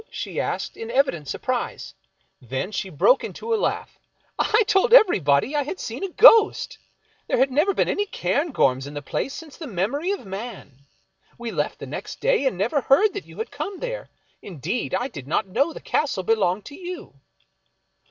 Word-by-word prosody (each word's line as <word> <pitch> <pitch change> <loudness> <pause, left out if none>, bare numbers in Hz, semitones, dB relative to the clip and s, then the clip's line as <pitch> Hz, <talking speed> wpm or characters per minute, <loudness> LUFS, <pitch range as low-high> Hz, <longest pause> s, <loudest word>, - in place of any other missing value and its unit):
she - - -5
asked, - - -3
in 225 - -7
evident 235 - +1
surprise. - - -3 0.5
Then 130 - -4
she 195 -1 -3
broke 185 - +3
into 460 0 -4
a - - +4
laugh. 430 - -2 0.2
" - - -40
I 435 +1 +3
told 415 +3 +3
everybody 215 - +4
I 295 - +2
had 300 +7 -5
seen 235 - -5
a 390 - -2
ghost; 445 +3 +6 0.5
there - - +1
had 265 +2 +3
never 305 +9 +3
been - - +1
any 410 0 0
Cairngorms 140 - 0
in 145 - -9
the 145 - -5
place 265 - -3
since 310 0 -10
the 320 - -7
memory 240 - -1
of 400 - -3
man. 190 - -8 0.5
V/e 235 -1 -4
left - - -2
the - - -8
next - - -7
day, - - +2
and 225 - -1
never 235 - +1
heard 390 - +4
that 405 - -6
you - - -14
had 445 - -4
come 395 -1 -5
there; - - -5 0.3
indeed, 185 - -3
I 245 - -1
did 140 - -10
not 155 - 0
know 260 - +1
the - - -9
castle 270 -11 -1
belonged 205 -2 +1
to 285 - -9
you." 350 - -9
265 Hz, 190 wpm, -23 LUFS, -, 0.5 s, ghost